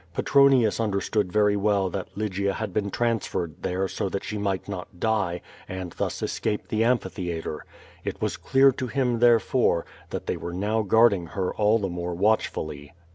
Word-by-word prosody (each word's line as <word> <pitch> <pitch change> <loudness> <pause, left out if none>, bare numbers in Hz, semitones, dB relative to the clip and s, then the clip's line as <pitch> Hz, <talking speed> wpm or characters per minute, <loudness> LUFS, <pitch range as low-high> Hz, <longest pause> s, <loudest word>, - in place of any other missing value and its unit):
Petronius 135 -5 +4
understood 105 -2 0
very 105 0 +3
well 100 -1 +2
that 95 0 -4
Lygia 100 -1 -1
had 110 -4 -4
been 100 0 0
tran^ 115 +2 +1
ferred 85 -5 -4
there 95 +2 -1
so 95 - -3
that 100 - -3
she 105 - -5
might 100 -2 -2
not 90 -3 -7
die, 105 -6 0 0.3
and 95 -1 -5
thus - - -3
escape 105 - -2
the 110 +1 +1
amphitheatre. 90 -10 -2 0.4
It - - -4
was - - -1
clear 135 +1 +4
to 130 0 -4
him, 125 -2 0
therefore, 120 -5 +3 0.2
that - - -5
they - - -2
were 85 - -6
now 105 +4 0
guarding 105 -4 +4
her 95 +1 -2
all 105 +1 +3
the 100 -3 -2
more 90 -1 -4
watchfully. 80 -7 -1
100 Hz, 175 wpm, -25 LUFS, 90-110 Hz, 0.4 s, Petronius